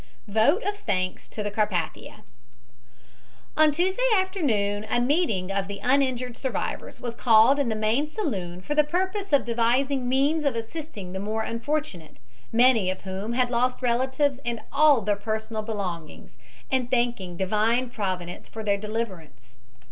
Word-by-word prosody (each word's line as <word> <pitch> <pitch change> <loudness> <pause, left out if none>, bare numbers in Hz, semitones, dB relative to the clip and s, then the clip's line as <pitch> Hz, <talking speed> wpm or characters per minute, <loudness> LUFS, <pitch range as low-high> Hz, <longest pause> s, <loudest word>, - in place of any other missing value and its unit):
VOTE 220 - +3
OF 410 0 -2
THANKS 185 - -2
TO 205 -1 -4
CARPATHIA 205 -6 -2 1.3
"On 310 -1 +5
Tuesday 370 - 0
afternoon 250 - 0
a - - +2
meeting 240 - +1
of 195 0 -1
the 200 0 -6
uninjured 255 -2 +1
survivors 265 - -4
was 240 -1 -4
called 235 +3 +5
in 275 -4 +1
the 220 - -1
main 220 +8 +1
saloon 190 - -3
for 295 - -2
the 300 0 +4
purpose 375 +5 -2
of 285 - +4
devising 245 +3 +1
means 285 +5 +2
of 280 -4 +1
assisting 225 - -6
the 190 - -3
more 215 +3 -2
unfortunate, 230 - -3 0.3
many 230 -4 +4
of 185 - -4
whom 195 +4 -4
had 250 0 +1
lost 250 +2 0
relatives 260 +3 +1
and 235 -2 -3
all 295 -5 +5
their 205 0 +1
personal 220 +1 -3
belongings, 190 -8 -6 0.4
and 255 -2 +1
thanking 235 -8 -1
Divine 220 +6 +1
Providence 185 -5 -4
for 220 - -7
their 200 -1 +1
deliverance. 185 - -6
230 Hz, 150 wpm, -25 LUFS, 205-275 Hz, 1.3 s, On